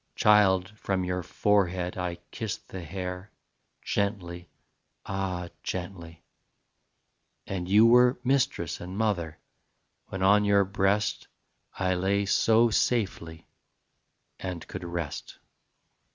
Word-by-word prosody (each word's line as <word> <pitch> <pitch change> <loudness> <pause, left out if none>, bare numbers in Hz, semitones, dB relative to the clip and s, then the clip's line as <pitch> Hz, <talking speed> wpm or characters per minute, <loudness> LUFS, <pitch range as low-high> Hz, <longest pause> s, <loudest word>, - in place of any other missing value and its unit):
Child, 100 -1 +4
from 95 -2 -1
your 90 0 -2
forehead 90 -1 0
I 90 -1 -3 0.2
kissed 110 -3 -5
the 95 - -6
hair, 90 +3 -6 0.5
Gently, 90 -4 -2 0.6
ah, 95 -3 -3
gently: 90 -3 -6 1.2
And 90 -2 -4
you 105 +3 +6
were 125 +2 +6
Mistress 125 - 0
and 90 +2 -7
mother 90 -8 -1 0.7
When 95 0 -4
on 105 +2 +5
your 100 -1 +4
breast 100 +2 0 0.5
I 95 -1 +1
lay 95 +2 +1
so 115 +3 +4
safely 95 -9 -1 0.9
And 90 -3 -6
could - - -7
rest. 85 -3 -5
95 Hz, 105 wpm, -27 LUFS, 90-105 Hz, 1.2 s, you